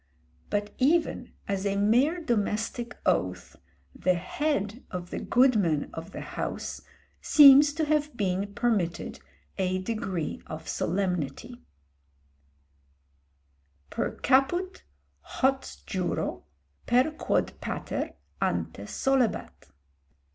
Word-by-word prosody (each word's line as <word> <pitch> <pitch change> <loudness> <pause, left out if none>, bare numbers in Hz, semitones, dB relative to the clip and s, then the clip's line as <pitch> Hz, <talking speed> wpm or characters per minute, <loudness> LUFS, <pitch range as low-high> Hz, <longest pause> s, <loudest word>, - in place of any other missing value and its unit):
But 205 0 -2
even 320 +6 +1 0.2
as 195 -1 -1
a 200 -1 0
mere 245 - +3
domestic 235 -1 -1
oath, 90 0 0 0.4
the 185 0 +1
head 210 - -2
of 175 -1 -6
the - - -3
goodman 210 - +2
of 165 +1 -7
the - - -7
house - - -5 0.4
seems 290 0 +8
to 315 0 0
have 300 -3 0
been 195 0 -1
permitted 205 -8 -1 0.4
a 185 -1 +1
degree 185 -5 -3
of 160 +1 -7
solemnity 180 - -2 2.3
"Per - - -2
caput 350 +8 +1 0.4
hoc 265 0 0 0.2
juro, 185 -3 -2 0.4
per 250 +5 +4
quod 310 - 0
pater - - -4 0.3
ante - - -1
solebat." 260 - 0
215 Hz, 95 wpm, -28 LUFS, 185-270 Hz, 2.3 s, seems